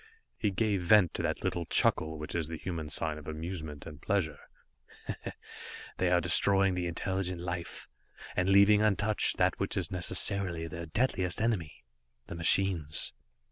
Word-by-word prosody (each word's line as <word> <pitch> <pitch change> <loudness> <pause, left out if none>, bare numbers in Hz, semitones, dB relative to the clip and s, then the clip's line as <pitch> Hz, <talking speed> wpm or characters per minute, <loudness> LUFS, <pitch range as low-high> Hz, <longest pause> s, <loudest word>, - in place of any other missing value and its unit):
He 105 - 0
gave 100 0 0
vent 90 -1 +5
to - - -3
that - - -2
little 85 -2 -2
chuckle 80 0 +1
which 75 0 -7
is 85 -3 -1
the 80 0 -6
human 80 -3 -5
sign 75 +1 -1
of 75 - -14
amusement 80 -2 -6
and 75 -2 -10
pleasure. 80 -8 -1 1.6
"They 90 - +1
are 90 0 +4
destroying 95 +3 +4
the 90 -1 -2
intelligent 90 +1 -2
life 85 -1 -5 0.5
and 90 +1 +1
leaving 100 +2 +6
untouched 105 0 +2
that - - +1
which - - -2
is - - -1
necessarily 90 -1 0
their 85 +1 -7
deadliest 95 -2 0
enemy 100 - -2 0.4
the - - -8
machines. 85 -2 +1
90 Hz, 150 wpm, -30 LUFS, 80-95 Hz, 1.6 s, leaving